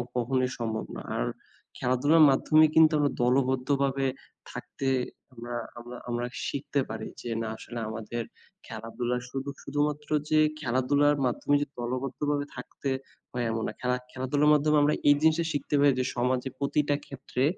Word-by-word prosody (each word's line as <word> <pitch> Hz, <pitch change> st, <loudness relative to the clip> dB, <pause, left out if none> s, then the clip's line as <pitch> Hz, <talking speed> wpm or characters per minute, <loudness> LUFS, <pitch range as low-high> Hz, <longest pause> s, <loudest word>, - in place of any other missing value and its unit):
কখনই 130 Hz, +1 st, +1 dB
সম্ভব 110 Hz, -1 st, -2 dB
না। -, -, -6 dB, 0.2 s
আর -, -, 0 dB, 0.5 s
খেলাধুলার 145 Hz, +6 st, +4 dB
মাধ্যমে 155 Hz, +3 st, +5 dB
কিন্তু 160 Hz, 0 st, +7 dB
আমরা 145 Hz, -1 st, +2 dB
দলবদ্ধভাবে 135 Hz, +1 st, +1 dB, 0.5 s
থাকতে 135 Hz, -, -5 dB, 0.5 s
আমরা, 120 Hz, 0 st, -6 dB, 0.2 s
আমরা, 120 Hz, +1 st, -9 dB
আমরা 120 Hz, +1 st, -1 dB, 0.2 s
শিখতে 140 Hz, 0 st, -2 dB
পারি 110 Hz, 0 st, -5 dB
যে, 120 Hz, -, -6 dB
না 115 Hz, -, -2 dB
আসলে 120 Hz, 0 st, -7 dB
আমাদের 110 Hz, +2 st, -4 dB, 0.4 s
খেলাধুলার 120 Hz, +2 st, -3 dB
সুধু 135 Hz, +2 st, -4 dB
শুধুমাত্র 150 Hz, 0 st, -2 dB, 0.2 s
যে 155 Hz, -, +4 dB, 0.2 s
খেলাধুলার 145 Hz, +3 st, +2 dB
মাধ্যমে 135 Hz, +3 st, +1 dB
যে 145 Hz, -, -1 dB
দলবদ্ধভাবে 135 Hz, +4 st, -2 dB
থাকতে 140 Hz, -, -5 dB, 0.4 s
হয় 120 Hz, -1 st, -2 dB
এমন 115 Hz, 0 st, -2 dB
না। 110 Hz, -, -4 dB
খেলা 125 Hz, 0 st, +1 dB, 0.2 s
খেলাধুলার 140 Hz, +3 st, +1 dB
মাধ্যমে 150 Hz, +1 st, +3 dB
আমরা 150 Hz, +1 st, +4 dB, 0.2 s
এই 145 Hz, -, +7 dB
জিনিসটা 160 Hz, +1 st, +3 dB
শিখতে 145 Hz, 0 st, -1 dB
পারি 140 Hz, -1 st, +6 dB
যে, 130 Hz, -, +1 dB
সমাজে 125 Hz, +2 st, 0 dB
প্রতিটা 145 Hz, +1 st, +1 dB
ক্ষেত্রে 135 Hz, -1 st, -3 dB
130 Hz, 145 wpm, -28 LUFS, 120-145 Hz, 0.5 s, কিন্তু